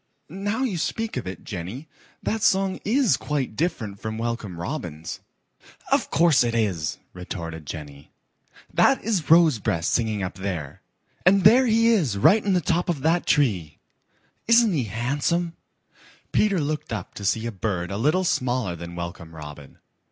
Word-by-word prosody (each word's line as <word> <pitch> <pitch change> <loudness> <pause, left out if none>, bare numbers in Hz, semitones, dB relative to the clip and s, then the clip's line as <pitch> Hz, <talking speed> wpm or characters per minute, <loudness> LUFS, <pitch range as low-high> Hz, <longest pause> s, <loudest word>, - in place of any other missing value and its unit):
Now 205 - -2
you 200 -10 -1
speak 225 +7 -2
of 125 - -4
it, 95 -2 -7
Jenny, 100 - -6 0.4
that 220 0 -1
song 190 -2 +2
IS 230 - +3
quite 140 -7 -3
different 115 - -2
from 110 +1 -5
Welcome 115 -6 -4
Robin's." 85 - -5 0.7
"Of - - +2
course 165 -4 +4
it 120 -1 -1
is," 95 -9 0 0.2
retorted 85 -4 -7
Jenny. 70 -2 -8 0.6
"That 270 - +4
is 200 -9 -1
Rosebreast 145 - +4
singing 110 -4 0
up 90 - -3
there, 90 -7 -5 0.4
and 190 +1 +5
there 245 +6 +7
he 230 +1 +4
is 160 - +2
right 205 - +5
in 200 - +1
the 180 - +2
top 175 +2 0
of 155 -6 -1
that 165 +4 +1
tree. 95 - +1 0.7
Isn't 230 -3 +5
he 135 -7 0
handsome?" 145 - -1 0.8
Peter 200 -4 +2
looked 150 -2 -3
up 110 - -5
to 100 - -8
see 110 +3 0
a 115 - -2
bird 95 -3 -3
a 100 - -3
little 155 - +2
smaller 125 - 0
than 85 +1 -8
Welcome 85 -1 -7
Robin. 75 -2 -10
120 Hz, 160 wpm, -24 LUFS, -, 0.8 s, there